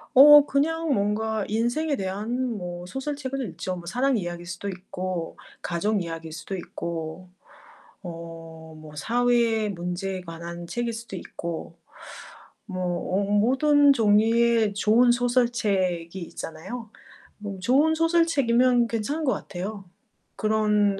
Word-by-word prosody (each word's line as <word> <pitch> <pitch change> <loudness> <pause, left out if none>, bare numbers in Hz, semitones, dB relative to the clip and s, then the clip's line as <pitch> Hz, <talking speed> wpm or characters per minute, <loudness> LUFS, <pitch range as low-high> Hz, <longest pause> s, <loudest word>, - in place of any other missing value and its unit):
어 295 +2 +10
그냥 320 +3 0
뭔가 210 0 0
인생에 240 +8 0
대한 220 +4 -2
뭐 175 -1 -6
소설책을 270 +3 -4
읽죠. 185 - -4
뭐 175 -1 -9
사랑 250 +7 +1
이야기일 175 -2 -5
수도 185 +2 -6
있고 185 -2 -5 0.2
가족 200 +4 0
이야기일 165 -1 -6
수도 165 +5 -6
있고 170 0 -6 0.7
어 165 -2 -8 0.2
뭐 155 -1 -12
사회의 235 +2 +2
문제에 185 +1 -4
관한 170 0 -8
책일 240 +2 -2
수도 225 -3 -7
있고 170 -2 -6 0.9
뭐 185 -2 -4 0.3
어 200 - +1
모든 265 +8 +4
종류의 225 -1 +3
좋은 230 +4 +4
소설책이 210 -8 0
있잖아요. 185 +7 -7 0.5
뭐 205 -2 -6
좋은 280 +11 +3
소설책이면 275 -8 +3
괜찮은 235 +8 -2
것 265 - +2
같아요. 195 +1 -6 0.5
그런 210 -1 +2
210 Hz, 250 characters per minute, -25 LUFS, 180-245 Hz, 0.9 s, 어